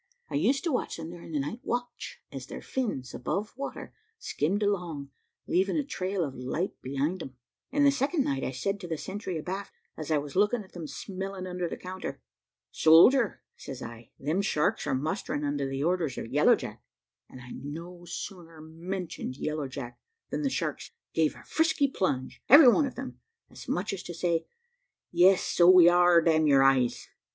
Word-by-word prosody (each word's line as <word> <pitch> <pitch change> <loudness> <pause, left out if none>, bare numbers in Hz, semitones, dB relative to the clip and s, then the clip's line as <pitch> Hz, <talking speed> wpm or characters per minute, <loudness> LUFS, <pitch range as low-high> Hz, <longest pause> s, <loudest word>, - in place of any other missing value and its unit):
I - - -6
used 220 - +2
to 340 - 0
watch 250 - -2
them 165 0 -7
during 170 -1 -10
the 150 - 0
night 150 - -4
watch, 245 -3 -4
as - - -7
their - - -8
fins, 200 - -3
above 200 - -3
water, 275 +2 -6 0.2
skimmed 195 - -1
along, 170 -9 -2 0.3
leaving 190 - +1
a 300 - +1
trail 190 -8 -2
of 140 -4 -4
light 135 +9 -3
behind 140 +7 -2
them; 130 -4 -8 0.4
and 290 -1 +3
the 280 - +7
second 280 +3 +1
night 135 - -1
I - - -1
said 195 +10 -2
to 180 - -7
the 165 -2 -3
sentry 190 0 -5
abaft, 190 +5 -5 0.2
as 155 -1 -6
I 155 - +3
was 145 -1 -5
looking 210 +4 +2
at 190 - -19
them 165 -3 -6
smelling 190 +2 -6
under 180 -1 -3
the - - -5
counter 185 0 -6 0.5
`Soldier,' 200 +10 +6
says 130 -1 -8
I, 115 0 -10
`them 160 +8 0
sharks 150 -6 0
are - - +1
mustering 150 +1 -2
under 145 -1 -1
the 135 +1 -2
orders 165 -5 0
of - - -4
Yellow - - +6
Jack;' - - -8 0.5
and 130 - -11
I 125 0 -11
no 170 +5 -8
sooner 170 -2 -7
mentioned 165 -3 -6
Yellow 155 -1 -2
Jack, 130 -2 -8 0.3
than - - -2
the 280 - +1
sharks - - -3 0.2
gave - - +2
a - - -14
frisky 320 -3 +2
plunge, 140 - -2
every 280 +1 +10
one 285 +4 +3
of 260 - -8
them, 260 +1 -7 0.3
as - - -11
much 190 +3 -1
as 195 - -5
to 175 - -8
say, 165 -1 0 0.7
`Yes, 180 +2 +6
so 175 0 +5
we 180 -2 +9
are, 175 -1 +6
damn 160 -1 +3
your 135 -2 +6
eyes.' 130 -3 +2
175 Hz, 190 wpm, -28 LUFS, 145-200 Hz, 0.7 s, every